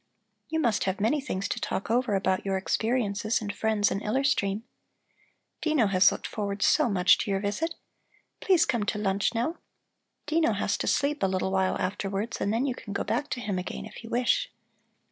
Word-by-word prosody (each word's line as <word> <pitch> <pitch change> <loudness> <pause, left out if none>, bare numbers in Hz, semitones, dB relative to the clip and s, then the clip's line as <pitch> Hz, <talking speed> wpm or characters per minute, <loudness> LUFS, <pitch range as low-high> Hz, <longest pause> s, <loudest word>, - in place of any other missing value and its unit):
You 320 - 0
must 235 -9 +1
have 190 0 -1
many 235 +8 +1
things 200 -8 -3
to - - -3
talk 200 - -2
over 240 -3 +2
about 190 -1 +1
your 195 -1 0
experiences 215 +1 0
and 205 -1 -4
friends 210 -1 +1
in 195 - -2
Iller 260 +6 0
Stream. 210 -6 +1 1.0
Dino 310 -7 +2
has 190 -1 +5
looked - - -6
forward 200 -1 -3
so - - +4
much 185 0 +4
to - - -2
your 195 -1 +1
visit. 210 +12 -2 0.6
Please 355 -4 +4
come 235 -4 0
to 210 - 0
lunch 200 +2 0
now. 245 +9 -1 0.7
Dino 310 -5 +2
has 200 0 0
to - - -2
sleep 290 +1 +1
a 195 - +3
little 190 0 -1
while 190 -1 +1
afterwards, 195 +3 -3
and 200 - +1
then 230 +5 +1
you 265 - 0
can 205 -4 -8
go - - -1
back 290 - -1
to 245 - -3
him 200 -4 -2
again, 180 - -5
if 220 - -11
you 225 - -9
wish." 250 - +1
210 Hz, 200 wpm, -27 LUFS, 195-250 Hz, 1.0 s, has